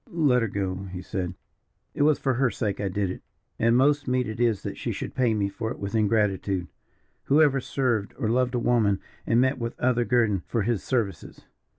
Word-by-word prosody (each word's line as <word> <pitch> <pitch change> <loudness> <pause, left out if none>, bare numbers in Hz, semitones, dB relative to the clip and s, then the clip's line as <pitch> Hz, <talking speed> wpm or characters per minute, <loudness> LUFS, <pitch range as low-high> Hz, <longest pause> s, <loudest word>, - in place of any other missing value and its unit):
"Let 145 -7 +2
her 115 - +1
go 100 -2 -2
on," 95 +1 -6
he 90 -1 -7
said. 90 -1 -4 0.6
"It - - -3
was 150 0 +4
for 135 - 0
her 125 +1 +2
sake 105 -4 -3
I 100 - -1
did 95 0 -1
it, - - -8 0.4
and 115 +1 +4
most 145 +2 +3
meet 125 0 +1
it 110 +1 -6
is 115 -4 +1
that - - -4
she - - -3
should - - -5
pay 125 -4 +2
me 100 -2 +1
for 110 +3 -4
it - - -5
with 100 0 -5
ingratitude. 100 -4 +1 0.6
Who 145 +3 +4
ever 145 -3 +4
served 120 -6 -1
or 120 - -1
loved 125 +2 +1
a - - +1
woman 110 -5 +2 0.3
and 115 - +3
met 130 +1 +2
with 115 0 -5
other 120 -1 +2
guerdon 115 -6 +2
for 115 -4 0
his 115 -2 0
services? 110 - -3
115 Hz, 220 wpm, -26 LUFS, 100-125 Hz, 0.6 s, was